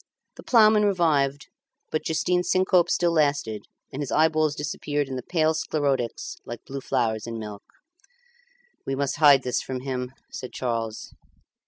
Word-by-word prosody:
The - - -11
ploughman 215 -3 +5
revived, 150 -8 +1 0.4
but 155 - -1
Justin's 180 +2 0
syncope 185 -2 +3
still 175 -1 +2
lasted, 145 -9 0 0.3
and 140 - -4
his 140 - -4
eyeballs 155 -1 +2
disappeared 145 -1 -2
in 135 - -5
the 130 - -4
pale 160 +2 +1
sclerotics 140 -6 -2
like 120 0 -8
blue 135 0 -6
flowers 115 -5 -1
in 115 -1 -5
milk. 105 -2 -7 1.2
"We 135 - -2
must 140 0 -1
hide 145 -3 +6
this 125 - -1
from 130 -1 -5
him," 125 -1 -4 0.2
said 125 - -7
Charles. 115 -3 -3
140 Hz, 150 wpm, -25 LUFS, 125-160 Hz, 1.2 s, hide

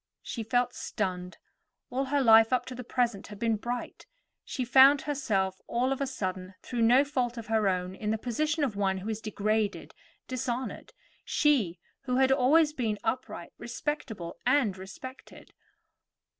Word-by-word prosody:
She 235 - -5
felt 245 +2 +1
stunned; 185 -4 -4 0.5
all 265 +2 0
her 285 +1 +1
life 225 -1 +7
up 255 - +1
to 255 - -7
the 250 0 -7
present 235 -4 -1
had 210 - -10
been 225 +1 +1
bright. 240 - -5 0.4
She 255 - -3
found 270 +3 +7
herself 205 -10 -1
all 250 +3 0
of 270 - -6
a 275 - 0
sudden, 185 -6 -4
through 240 -2 -3
no 245 +4 +6
fault 250 -4 -1
of 230 - -6
her 220 -2 +1
own, 180 0 -2
in 210 +2 -4
the 220 - +1
position 300 +7 -1
of 250 -7 -1
one 195 -1 0
who 195 +4 -5
is 220 0 -5
degraded, 215 0 -1 0.3
dishonored; 255 0 -4 0.3
she, 245 - +2 0.3
who 250 -1 0
had 265 0 +4
always 295 +4 +4
been 225 -7 -1
upright, 250 +3 -3
respectable, 230 - -4
and 250 -6 +2
respected. 195 +8 -11
235 Hz, 160 wpm, -29 LUFS, 210-265 Hz, 0.5 s, life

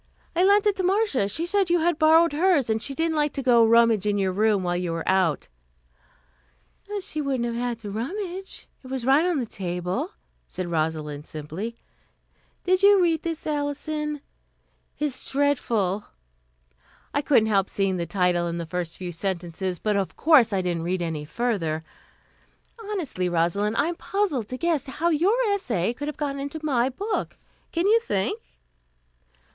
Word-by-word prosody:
I 350 - +3
lent 405 +2 +5
it 415 -2 +3
to 375 - -1
Marcia. 370 - +1
She 320 +11 -1
said 390 0 +1
you 345 -1 +3
had 340 -1 +1
borrowed 320 +1 +5
hers, 300 -7 +2
and 220 0 0
she 275 +3 -2
didn't 325 +1 0
like 295 -1 +1
to 275 - -3
go 245 -2 +5
and 225 - +5
rummage 230 -3 +4
in 205 0 +1
your 190 -1 +1
room 210 0 +2
while 175 0 0
you 175 -1 -2
were 165 0 -4
out 185 -6 +2 0.8
" 65 - -11
"She 310 -4 -3
wouldn't 265 -4 -1
have 235 - -2
had 240 0 -2
to 205 -2 -6
rummage. 365 - -5 0.2
It - - -11
was 260 -2 -3
right 275 +4 +5
on 355 -2 +1
the 255 - -1
table," 185 - -3 0.3
said 180 -2 -5
Rosalind 155 -2 -2
simply. 160 +10 -6 0.9
"Did 370 +1 +2
you 400 0 +7
read 335 -3 +2
this, 330 -2 -4
Alison? 300 0 -2 0.8
It's 290 -4 -3
dreadful 235 -9 0 0.5
" - - -34
"I 285 - +1
couldn't 250 -7 +3
help 195 -2 +2
seeing 195 -2 0
the 170 -1 -3
title 175 -1 +1
and 170 0 -3
the 170 - -4
first 170 0 -4
few 180 -1 -5
sentences, 180 0 -3
but 210 +4 -1
of 195 -2 -1
course 285 -8 +5
I 190 -2 0
didn't 175 -2 -1
read 175 +1 -1
any 160 -3 -3
further. 165 -6 -1 1.1
Honestly, 295 - -2
Rosalind, 175 +6 0
I 300 - +2
am 345 - -3
puzzled 360 - -1
to 255 - -5
guess 330 -2 0
how 315 +6 -1
your 350 +8 +2 0.2
essay 235 - -1
could 290 +4 -6
have 300 - -5
got 285 -2 -2
into 285 +3 -5
my 260 -4 +2
book. 405 - -3 0.3
Can 335 +2 0
you 440 +3 +5
think?" 200 - -2
240 Hz, 180 wpm, -25 LUFS, -, 1.1 s, you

